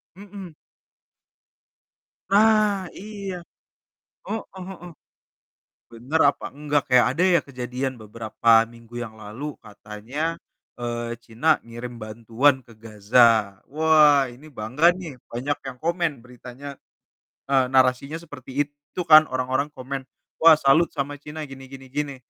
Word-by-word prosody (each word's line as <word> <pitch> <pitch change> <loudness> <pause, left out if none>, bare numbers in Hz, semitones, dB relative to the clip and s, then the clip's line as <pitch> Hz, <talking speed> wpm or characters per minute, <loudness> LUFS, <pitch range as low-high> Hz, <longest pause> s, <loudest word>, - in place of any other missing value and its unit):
Mhm. 195 -3 -11 1.7
Nah, 205 -2 +3
iya. 200 -2 -6 0.9
Heeh 205 -3 -6
heeh. 180 -2 -10 1.0
Bener 130 +8 -2
apa - - -13
enggak? 145 +1 0
Kayak, 125 -1 +5
ada 165 +6 -1
ya 180 -3 +4
kejadian 130 0 -4
beberapa 110 +1 -5 0.2
minggu 115 0 -16
yang 110 -2 -11
lalu 125 +8 -7
katanya, 110 +10 -5 0.4
eee, 120 0 -3
Cina 120 +7 +1
ngirim 120 +1 -8
bantuan 115 +5 +1
ke 120 - -17
Gaza. 110 -1 +3
Wah, 150 -2 +4
ini 140 +6 -14
bangga 130 +4 0
nih, 160 -9 -9
banyak 135 +5 -2
yang 130 - -7
komen 170 0 0
beritanya. 125 +3 -10 0.7
Eee, 135 -2 +4
narasinya 130 +3 +2
seperti 145 -6 -12
itu 145 +4 -9
kan, 155 -1 +8
orang-orang 130 +3 -1
komen. 135 +1 -5 0.4
"Wah, 160 -1 +8
salut 150 +4 +4
sama 145 -1 -4
Cina 150 +1 -7
gini 135 -1 -11
gini 135 0 -11
gini." 145 +1 -3
135 Hz, 120 wpm, -24 LUFS, 120-155 Hz, 1.7 s, kan